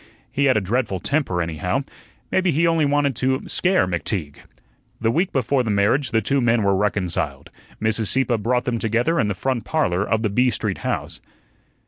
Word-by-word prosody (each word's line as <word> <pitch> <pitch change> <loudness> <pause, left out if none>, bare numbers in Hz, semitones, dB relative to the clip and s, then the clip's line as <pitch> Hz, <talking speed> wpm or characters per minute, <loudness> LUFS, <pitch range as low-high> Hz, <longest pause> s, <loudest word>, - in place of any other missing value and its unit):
He 140 - +1
had 130 -4 +4
a - - +1
dreadful 105 -1 -1
temper, 95 - 0
anyhow. 85 - -2 0.5
Maybe 190 -1 +2
he 165 +2 +2
only 165 -2 +3
wanted 145 -2 +1
to 130 +1 0
scare 185 - +2
McTeague. 85 -3 -3 0.6
The 115 0 +1
week 175 +8 0
before 135 0 +1
the 115 - -3
marriage 105 +7 +2
the 115 -1 +1
two 135 +6 +1
men 120 -2 +2
were 100 -1 +3
reconciled. 90 -8 -2 0.3
Mrs. 110 0 0
Sieppe 130 -1 +1
brought 125 +4 0
them 120 -3 -1
together 120 +10 +1
in 105 - +2
the 105 - -2
front 130 +2 -2
parlor 100 - 0
of 110 +2 0
the 110 - +1
B 125 +4 +3
Street 105 -5 -2
house. - - -4
115 Hz, 185 wpm, -22 LUFS, 100-135 Hz, 0.6 s, had